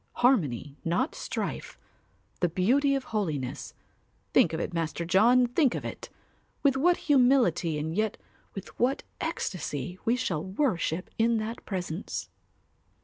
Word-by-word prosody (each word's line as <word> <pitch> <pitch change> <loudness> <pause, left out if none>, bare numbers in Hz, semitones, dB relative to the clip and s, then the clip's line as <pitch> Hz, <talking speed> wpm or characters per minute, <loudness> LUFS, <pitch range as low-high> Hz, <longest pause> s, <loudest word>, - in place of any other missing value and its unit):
Harmony 150 - +1
not 175 - 0
strife, - - -4 0.6
the 175 - +2
Beauty 265 - +2
of 270 - -2
Holiness, 155 - -3 0.6
think - - +5
of 160 - -3
it, 175 - -3
Master 165 0 -2
John, 230 +8 +5
think 250 +2 +2
of - - -4
it! - - -7 0.5
With 275 -2 +4
what 345 +6 +3
humility 245 - +3
and 160 +2 -3
yet 215 0 0 0.4
with 195 - -7
what 255 +3 +1 0.2
ecstasy 180 - -3
we 235 - +2
shall 180 -11 -2
worship 185 - -1
in 230 0 +3
that 220 +2 -4
presence. 180 -2 -4
200 Hz, 135 wpm, -28 LUFS, 165-250 Hz, 0.6 s, think